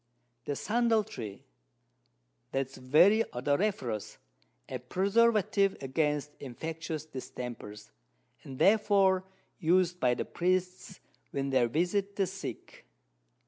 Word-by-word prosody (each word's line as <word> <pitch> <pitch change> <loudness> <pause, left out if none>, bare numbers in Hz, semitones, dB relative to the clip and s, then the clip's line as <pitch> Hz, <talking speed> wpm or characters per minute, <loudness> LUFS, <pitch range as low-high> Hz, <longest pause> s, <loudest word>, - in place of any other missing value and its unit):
The 145 - -2
Sandal 225 - +2
Tree, 110 - -8 1.1
that 135 0 +1
is 130 - -15
very 180 - +5
odoriferous, 135 - -1 0.5
a 130 - -5
Preservative 200 - +2
against 150 +1 -1
infectious 160 +4 -5
Distempers, 120 - -8 0.5
and 135 -1 -9
therefore 195 -2 +4 0.4
us'd 180 +1 +2
by 125 -4 +3
the - - -3
Priests 185 +1 -1 0.3
when 135 0 -2
they 130 -2 +4
visit 190 - 0
the 195 - +2
Sick. 195 +1 -8
165 Hz, 100 wpm, -30 LUFS, 130-195 Hz, 1.1 s, very